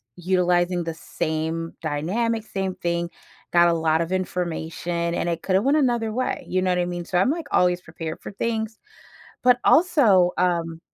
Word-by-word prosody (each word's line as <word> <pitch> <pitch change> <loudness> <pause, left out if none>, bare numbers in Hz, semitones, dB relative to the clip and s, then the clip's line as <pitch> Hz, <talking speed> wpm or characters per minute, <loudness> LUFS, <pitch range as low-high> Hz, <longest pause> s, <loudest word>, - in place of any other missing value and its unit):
utilizing 180 -1 +1
the 165 - -4
same 160 +1 -3
dynamic, 210 +10 -1
same 195 -3 -3
thing, 170 0 -2 0.4
got 175 0 +6
a 170 - +3
lot 160 0 +1
of 170 - -3
information, 170 -2 -2
and 175 - -1
it 165 -1 -3
could've 190 +1 +2
went 280 +4 +3
another 240 -6 +1
way, 255 +3 -2
you 185 - 0
know 185 - +2
what 180 - +1
I 175 - +1
mean? 175 -1 -4
So, 180 - 0
I'm, 195 - +3
like, 325 +2 -2
always 180 0 +3
prepared 160 -1 -7
for - - -7
things. 220 +1 -3 0.6
But 250 -1 +5
also, 235 - +5
um 170 -2 0
180 Hz, 175 wpm, -23 LUFS, 170-215 Hz, 0.6 s, got